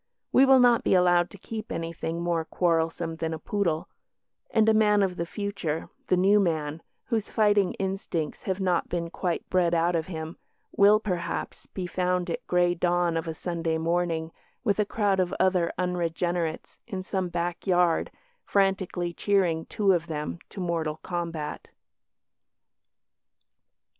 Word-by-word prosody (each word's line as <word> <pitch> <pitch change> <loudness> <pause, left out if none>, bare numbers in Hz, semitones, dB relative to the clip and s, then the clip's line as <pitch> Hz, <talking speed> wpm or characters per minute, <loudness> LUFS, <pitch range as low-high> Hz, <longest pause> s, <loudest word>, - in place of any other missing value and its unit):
We 270 +1 +6
will 265 -1 +7
not 245 -2 +5
be - - +3
allowed 175 -1 +4
to - - -12
keep 215 +2 -7
anything 165 0 -3
more 170 -2 0
quarrelsome 165 -1 0
than 160 0 -2
a - - -6
poodle 170 -2 -1 0.6
and 220 -1 +3
a 220 - +6
man 210 -2 +4
of 185 -2 -1
the 170 -1 -3
future, 200 -6 -3 0.2
the 185 - +3
New 195 +3 +5
Man, 160 -4 -1 0.2
whose 225 -4 -1
fighting 205 -3 +3
instincts 190 -5 -3
have 190 0 -1
not 180 -3 0
been 170 -1 -3
quite 175 -2 -2
bred 175 -2 +3
out 170 +1 +2
of 160 -1 -1
him, 160 -2 -6 0.4
will, 205 +1 +6
perhaps, 180 -5 -4
be 185 - -5
found 180 0 -1
at - - -5
grey 175 0 +3
dawn 175 -1 +1
of 165 0 -2
a 160 - -3
Sunday 165 -2 -2
morning 165 0 -1 0.3
with 210 -3 +1
a 210 - +3
crowd 200 -2 +1
of 185 0 0
other 180 -2 +2
unregenerates 175 -2 -2
in 190 -2 -4
some 185 0 -2
backyard 175 0 +1 0.3
frantically 190 -3 0
cheering 175 -5 +1
two 205 -3 +2
of 170 -2 -1
them 150 +1 -4
to - - -9
mortal 165 -4 -1
combat. 170 -4 -4
175 Hz, 155 wpm, -27 LUFS, 165-195 Hz, 0.6 s, will